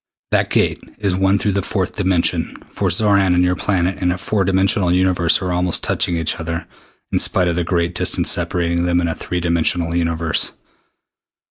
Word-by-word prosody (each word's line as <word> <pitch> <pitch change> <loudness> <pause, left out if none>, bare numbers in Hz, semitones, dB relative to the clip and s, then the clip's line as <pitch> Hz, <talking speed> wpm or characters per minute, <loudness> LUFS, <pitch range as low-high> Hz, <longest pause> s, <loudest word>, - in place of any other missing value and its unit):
"That - - +1
gate - - +1 0.2
is 100 -3 -1
the 95 - -2
one 95 +1 +3
through 105 +1 0
the 100 0 0
fourth 95 -1 -2
dimension, 95 -4 +1
for 100 - -1
Xoran 100 0 +3
and 90 - +3
your 90 0 +1
planet 95 -2 -1
in 90 -1 +2
a 90 - -2
four 100 +1 -1
dimensional 95 -1 +2
universe 90 -2 +2
are 90 - -2
almost 90 0 0
touching 85 - 0
each 80 +2 -1
other 85 0 -4 0.5
in - - +1
spite 90 -2 +1
of 85 - 0
the 90 - 0
great 85 0 -1
distance 90 - 0
separating 85 0 -1
them 85 0 +2
in 85 - 0
a 80 - -1
three 90 +2 -4
dimensional 85 0 +1
universe. 85 -2 0
90 Hz, 195 wpm, -19 LUFS, 85-95 Hz, 0.5 s, one